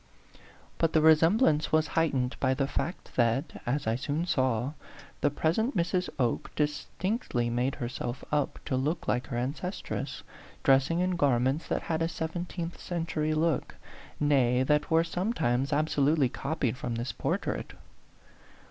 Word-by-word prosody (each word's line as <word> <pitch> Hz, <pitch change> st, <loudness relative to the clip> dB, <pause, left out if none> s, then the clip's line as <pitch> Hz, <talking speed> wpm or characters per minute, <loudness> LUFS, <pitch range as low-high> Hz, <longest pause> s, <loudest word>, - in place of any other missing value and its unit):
But 165 Hz, -1 st, +2 dB
the 155 Hz, -, +4 dB
resemblance 160 Hz, -, +4 dB
was 155 Hz, -1 st, +3 dB
heightened 135 Hz, -6 st, +1 dB
by 130 Hz, -1 st, +2 dB
the 135 Hz, -, +1 dB
fact 170 Hz, +5 st, -4 dB
that, 125 Hz, +5 st, +1 dB
as 140 Hz, +4 st, 0 dB
I 110 Hz, +1 st, +1 dB
soon 145 Hz, +5 st, -2 dB
saw, 130 Hz, -4 st, +1 dB, 0.5 s
the 145 Hz, -, +3 dB
present 180 Hz, -, 0 dB
Mrs. 180 Hz, +2 st, 0 dB
Oke 120 Hz, -4 st, 0 dB
distinct 155 Hz, -, -2 dB
ly 120 Hz, -1 st, +2 dB
made 125 Hz, +3 st, 0 dB
herself 120 Hz, -1 st, -4 dB
up 150 Hz, -2 st, 0 dB
to 130 Hz, -, -1 dB
look 150 Hz, +6 st, -1 dB
like 125 Hz, +1 st, 0 dB
her 120 Hz, -, -3 dB
ancestress, 145 Hz, +10 st, -4 dB, 0.4 s
dressing 135 Hz, +6 st, +4 dB
in 180 Hz, -1 st, 0 dB
garments 135 Hz, +1 st, +2 dB
that -, -, -1 dB
had 160 Hz, 0 st, -1 dB
a 165 Hz, -, +2 dB
seventeenth 170 Hz, +1 st, -4 dB
century 160 Hz, -3 st, -1 dB
look; 160 Hz, 0 st, 0 dB, 0.4 s
nay, 130 Hz, -4 st, +3 dB
that 150 Hz, +2 st, +2 dB
were 165 Hz, 0 st, +4 dB
sometimes 165 Hz, -, 0 dB
ab 150 Hz, +1 st, +2 dB
solutely 145 Hz, -2 st, +2 dB
copied 135 Hz, -4 st, -1 dB
from 120 Hz, -2 st, -3 dB
this 120 Hz, +2 st, -3 dB
portrait. -, -, -2 dB
150 Hz, 150 wpm, -29 LUFS, 130-165 Hz, 0.5 s, the